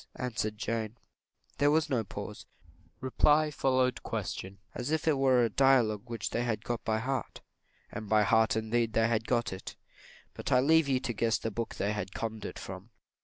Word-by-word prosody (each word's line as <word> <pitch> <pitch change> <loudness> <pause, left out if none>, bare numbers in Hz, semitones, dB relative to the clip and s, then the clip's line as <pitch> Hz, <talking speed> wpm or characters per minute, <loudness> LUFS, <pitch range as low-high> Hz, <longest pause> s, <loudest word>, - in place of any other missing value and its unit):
answered 115 -6 -3
Jane. 110 +1 -3 0.6
There 145 - +5
was 155 +1 +3
no 120 -4 0
pause 100 - -8 0.5
reply 150 +3 +3
followed 130 -3 +1
question, 95 +1 -4 0.2
as 125 +2 -4
if 160 0 -1
it 155 - +4
were 130 -2 +4
a - - 0
dialogue 120 -4 +3
which 115 -1 -3
they 115 - 0
had 110 -3 -2
got 120 -2 -3
by 110 -1 +1
heart 130 +1 -3 0.5
and 105 -1 -6
by 110 -1 +5
heart 110 +2 +3
indeed 110 +1 0
they 115 0 +3
had 115 -1 0
got 120 -5 0
it; 95 - -8 0.6
but - - -5
I 125 - +6
leave 160 +3 +4
you 130 -2 +2
to 125 -3 -2
guess 115 +1 +1
the 115 - -4
book 115 +2 -4
they 100 +2 -1
had 100 -3 -5
conned 110 -2 -4
it - - -6
from. 95 +3 -8
115 Hz, 190 wpm, -30 LUFS, 110-130 Hz, 0.6 s, I